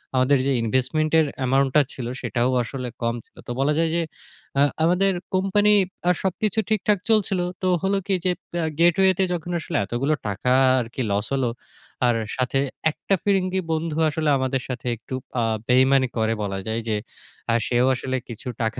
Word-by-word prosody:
আমাদের 130 +2 +4
যে, 140 - +2
ইনভেস্টমেন্ট 130 +7 0
এর 160 - +4
অ্যামাউন্ট 135 +1 +2
টা 150 - +7
ছিল 125 - -6 0.2
সেটাও 120 0 0
আসলে 125 +1 -5
কম 115 0 0
ছিল। - - -38
তো - - -4
বলা 140 +2 +2
যায় 165 0 +2
যে, 170 - +2 0.6
আ - - +5 0.2
আমাদের 185 +4 +3 0.2
কোম্পানি 205 +2 +3 0.3
আর 180 - +4
সবকিছু 195 +3 0
ঠিকঠাক 210 -2 +2
চলছিল। 205 -4 +2 0.2
তো 185 - 0 0.2
হলো 195 +1 +2
কি? 200 - +1
যে, 180 - +3 0.2
প - - -71
আ - - 0
গেটওয়ে 180 +3 +5
তে - - +4
যখন 175 0 -4
আসলে - - -3
এতগুলো 125 +9 0
টাকা 105 +5 -1 0.3
আরকি 120 +2 -4
লস 100 +1 0
হলো। 130 -3 +1 0.6
আর 120 - +3 0.2
সাথে 130 +1 0 0.3
একটা 195 - -1
ফিরিঙ্গি 190 -2 +1
বন্ধু 160 -1 -1
আসলে 155 +1 -1
আমাদের 130 0 -1
সাথে 125 -1 -5
একটু 115 +3 -7 0.3
আ - - +1 0.2
বেইমানি 130 +1 +4
করে 110 0 +1
বলা 95 -1 -3
যায় 110 +1 -1
যে, 105 - +1 0.5
আ - - +3
সেও 120 0 +2
আসলে 130 +1 -3
কিছু 115 +1 -7
টাকা 110 -1 -1
135 Hz, 180 wpm, -23 LUFS, 125-180 Hz, 0.6 s, টা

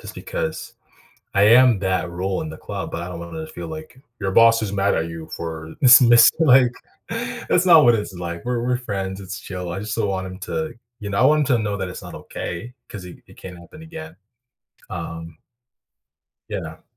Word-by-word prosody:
just - - -10
because - - -5 0.6
I 100 - +4
am 120 0 +6
that 95 -2 -1
role 95 +2 -2
in 80 - -6
the 80 - -10
club, - - -6
but 85 - -5
I 90 - -6
don't 90 - -7
wanna 85 - -7
feel 155 - -8
like 155 -4 -9 0.2
"Your 95 -1 -1
boss 115 +1 +5
is 100 - -3
mad 100 0 +1
at 80 +1 -1
you 80 -1 -8
for" 80 -1 -7
this 125 -3 +9
missed 120 -2 +6
like, 130 -5 +5 0.8
that's 180 +1 +2
not 165 -5 +8
what 120 - +6
it's 105 -2 -3
like, 85 -1 -6
we're 120 -1 -1
we're 125 0 +1
friends, 95 -5 -4
it's 95 0 -7
chill, 90 -3 -6
I 95 - -4
just 105 +1 -4
don't 110 -3 0
want 95 -1 -2
him 95 0 -9
to, 155 +10 -4 0.3
you 105 -1 -5
know, 100 - -1
I 130 - +4
want 150 +2 +5
him 125 - +4
to 110 - -1
know 105 -1 -2
that 95 - -3
it's 90 - -8
not - - -10
okay, 115 +9 -7
'cause 100 -4 -9
it 90 - -11
it - - -18
can't 90 -2 -10
happen 155 - -14
again, 160 0 -10 0.7
um 80 -1 -7 1.1
Yeah. - - -6
100 Hz, 210 wpm, -21 LUFS, 90-125 Hz, 1.1 s, this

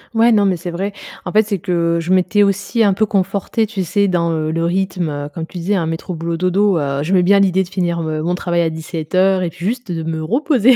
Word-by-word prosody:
Ouais, 230 +1 +5
non, 205 -2 +4
mais 190 -2 +1
c'est 175 +1 -6
vrai. 195 +4 -3 0.3
En - - -3
fait, 215 +1 +4
c'est 200 -3 -3
que, 170 -1 0
je 165 +2 -3
m'étais 185 +2 +3
aussi 200 +3 +1
un 200 -2 +4
peu 215 +3 +1
confortée, 200 +2 0
tu 195 -3 -3
sais, 200 +4 +1
dans, 170 -3 +1
heu, 155 -1 -1
le 165 +1 -1
rythme, 180 -2 -1
heu, 145 0 -5
comme 165 +1 -4
tu 175 +1 -9
disais, 195 +5 0
hein, 175 -4 0
métro-boulot-dodo. 170 +3 0
Heu, 140 0 -1
j'aimais 180 +2 +2
bien 200 +2 +5
l'idée 190 -1 +3
de 175 - -11
finir 175 -3 -1
me 155 -1 -2
mon 175 +2 0
travail 175 -1 0
à 165 - +1
17:00 180 +4 0
et 170 - -1
puis 170 - -12
juste 240 -3 -3
de 165 -1 -3
me 160 -1 -3
reposer! 255 - +3
180 Hz, 245 wpm, -18 LUFS, 165-200 Hz, 0.3 s, Ouais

